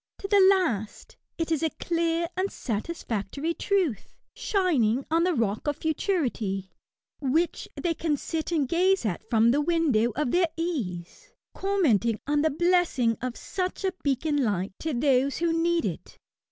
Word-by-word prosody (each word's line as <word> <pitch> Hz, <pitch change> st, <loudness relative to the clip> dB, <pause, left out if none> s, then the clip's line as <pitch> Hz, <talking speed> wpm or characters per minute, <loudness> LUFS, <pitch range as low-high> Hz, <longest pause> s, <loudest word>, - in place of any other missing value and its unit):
To 395 Hz, -, -6 dB
the 405 Hz, 0 st, +4 dB
last, 250 Hz, -, 0 dB, 0.2 s
it 330 Hz, -1 st, -2 dB
is 315 Hz, -, +1 dB
a 320 Hz, -, +1 dB
clear 335 Hz, 0 st, 0 dB
and 380 Hz, +2 st, -1 dB
satisfactory 260 Hz, +4 st, -3 dB
truth, 360 Hz, -, -1 dB, 0.2 s
shining 275 Hz, -, +1 dB
on 330 Hz, +1 st, +3 dB
the 360 Hz, -2 st, +1 dB
rock 220 Hz, +1 st, -1 dB
of 295 Hz, -1 st, 0 dB
futurity, 255 Hz, -, -1 dB, 0.5 s
which 310 Hz, +5 st, 0 dB
they 345 Hz, -2 st, 0 dB
can 310 Hz, -2 st, -1 dB
sit 320 Hz, +4 st, -4 dB
and 300 Hz, -5 st, +1 dB
gaze 370 Hz, +2 st, +2 dB
at 195 Hz, -3 st, -2 dB
from 230 Hz, 0 st, +4 dB
the 290 Hz, +4 st, +2 dB
window 295 Hz, -9 st, +2 dB
of 295 Hz, -4 st, 0 dB
their 355 Hz, -1 st, +3 dB
ease, 220 Hz, -, -4 dB, 0.2 s
commenting 250 Hz, -, +1 dB
on 295 Hz, +1 st, +1 dB
the 315 Hz, -, +3 dB
blessing 330 Hz, -8 st, +2 dB
of 250 Hz, -1 st, -4 dB
such 370 Hz, +1 st, -4 dB
a 380 Hz, -1 st, 0 dB
beacon 285 Hz, +1 st, 0 dB
light 195 Hz, -4 st, -1 dB
to 315 Hz, -4 st, -2 dB
those 270 Hz, +1 st, +2 dB
who 335 Hz, 0 st, +1 dB
need 335 Hz, +1 st, +1 dB
it. -, -, -5 dB
305 Hz, 155 wpm, -26 LUFS, 235-345 Hz, 0.5 s, the